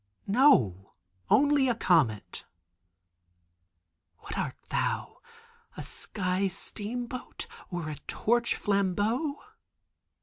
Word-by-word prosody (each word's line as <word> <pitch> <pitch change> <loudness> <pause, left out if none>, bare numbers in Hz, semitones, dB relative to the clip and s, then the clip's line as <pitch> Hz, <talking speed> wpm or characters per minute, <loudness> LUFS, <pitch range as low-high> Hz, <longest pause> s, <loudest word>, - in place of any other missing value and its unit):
No, 130 - +4 0.4
only 285 -1 +5
a 240 - +2
comet! 155 - +2 1.7
"What - - -8
art - - -2
thou—a - - -5
sky 185 +1 -1
steamboat, 235 +6 -4 0.2
or 175 -3 -4
a 150 -2 -5
torch 235 +1 +1
flambeau? 205 - 0
205 Hz, 75 wpm, -29 LUFS, 175-245 Hz, 1.7 s, only